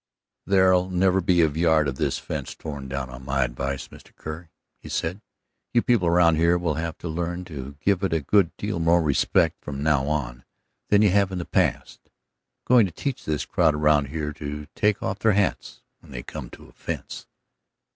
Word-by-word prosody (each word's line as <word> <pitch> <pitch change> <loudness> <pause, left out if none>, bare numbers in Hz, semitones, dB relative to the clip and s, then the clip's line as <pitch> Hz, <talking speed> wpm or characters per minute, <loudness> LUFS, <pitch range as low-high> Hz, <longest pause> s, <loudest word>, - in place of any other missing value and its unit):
"There'll 95 -1 +4
never 95 +1 +2
be 85 0 +3
a - - +5
yard 80 0 +2
of 65 -1 -3
this - - 0
fence - - -5
torn 70 -3 -7
down 65 -1 -4
on 65 +1 -10
my 70 0 +1
advice, 65 +2 -4
Mr. - - -16
Kerr," 80 +2 -8 0.3
he - - -11
said. 90 +6 -2 0.5
"You 120 - +4
people 115 -8 +2
around 85 -1 +4
here 85 +2 +3
will 85 -3 -1
have 80 +1 -4
to - - -7
learn 85 +2 -3
to 70 -5 -8
give 95 +3 +1
it 95 - 0
a 80 - +2
good 90 +4 +3
deal 100 -4 -3
more 85 +1 +3
respect 75 -3 +2
from 70 -1 -5
now 75 -3 +2
on 65 -5 -3 0.5
than 105 +1 +5
you 105 - +4
have 100 0 +2
in 95 - -3
the 85 - -4
past. - - 0
I'm - - -37 0.6
going 120 -3 +5
to - - -9
teach 135 - -4
this 75 -1 -1
crowd 75 - +2
around 75 -1 +3
here 75 0 -4
to 75 0 -6
take 105 -1 +1
off 95 +1 -2
their 110 +1 +3
hats 100 -1 -1 0.2
when - - -18
they - - -6
come - - -8
to - - -13
a - - -17
fence." - - -6
80 Hz, 205 wpm, -24 LUFS, 75-95 Hz, 0.6 s, a